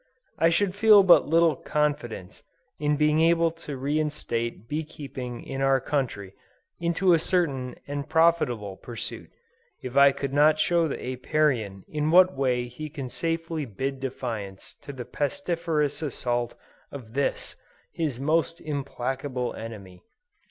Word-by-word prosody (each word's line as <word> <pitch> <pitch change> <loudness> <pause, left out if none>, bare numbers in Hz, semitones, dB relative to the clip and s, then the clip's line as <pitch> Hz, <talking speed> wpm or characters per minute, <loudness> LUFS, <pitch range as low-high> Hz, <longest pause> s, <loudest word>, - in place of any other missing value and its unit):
I 165 - +5
should 180 +3 +1
feel 210 0 +7
but 170 -5 +6
little 165 -1 +4
confidence 130 -11 -2 0.4
in 150 0 +1
being 150 +1 +3
able 165 0 +4
to 155 -4 -8
reinstate 135 -6 -2
bee 155 +4 -2
keeping 130 -5 -7
in 135 0 -5
our 135 0 +3
country, 125 -9 -3 0.5
into 170 +2 +2
a 165 - +4
certain 140 -8 0
and 145 +1 -4
profitable 160 - +2
pursuit, 120 -2 -7 0.5
if 125 0 -6
I 140 0 +7
could 140 0 -4
not 150 +2 +5
show 170 +1 +2
the 145 - -3
Apiarian 125 - -1
in 150 0 -1
what 185 +1 +6
way 125 -2 0
he 125 +6 -7
can 140 -4 -6
safely 165 0 -2
bid 135 +4 -4
defiance 115 -7 -5
to - - -8
the 125 -3 -7
pestiferous 160 -2 -1
assaults 120 -5 -2 0.4
of 120 -5 -10
this, 140 +1 -2 0.4
his 150 -7 -3
most 160 +3 +1
implacable 135 -3 -3
enemy. 100 -6 -9
140 Hz, 140 wpm, -26 LUFS, 125-160 Hz, 0.5 s, feel